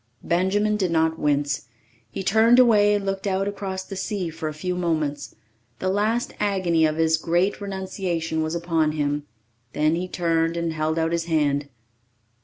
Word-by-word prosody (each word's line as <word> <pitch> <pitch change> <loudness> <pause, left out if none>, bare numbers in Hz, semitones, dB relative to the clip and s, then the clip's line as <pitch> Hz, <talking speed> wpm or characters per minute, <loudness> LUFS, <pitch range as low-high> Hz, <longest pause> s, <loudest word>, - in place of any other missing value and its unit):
Benjamin 205 +5 +1
did 190 -3 0
not 160 -1 +1
wince. 145 -3 0 0.4
He 190 - -5
turned 220 +5 +5
away 210 -4 +5
and 200 -1 -2
looked 195 +1 -2
out 195 0 0
across 195 -2 -4
the 195 - -8
sea 190 -2 -3
for 160 0 -4
a - - -4
few 165 +4 -3
moments. 155 -5 -2 0.4
The 185 - -2
last 215 +4 0
agony 185 -6 +2
of 155 0 -3
his 160 0 +3
great 175 +6 0
renunciation 185 -5 -3
was 155 +1 -2
upon 165 -3 0
him. 145 -1 -2 0.5
Then 155 +1 +2
he 175 +2 -2
turned 165 -2 0
and 170 -1 -1
held 155 +1 -1
out 165 0 +1
his 170 -1 -1
hand. 145 -3 0
170 Hz, 170 wpm, -24 LUFS, 160-195 Hz, 0.5 s, turned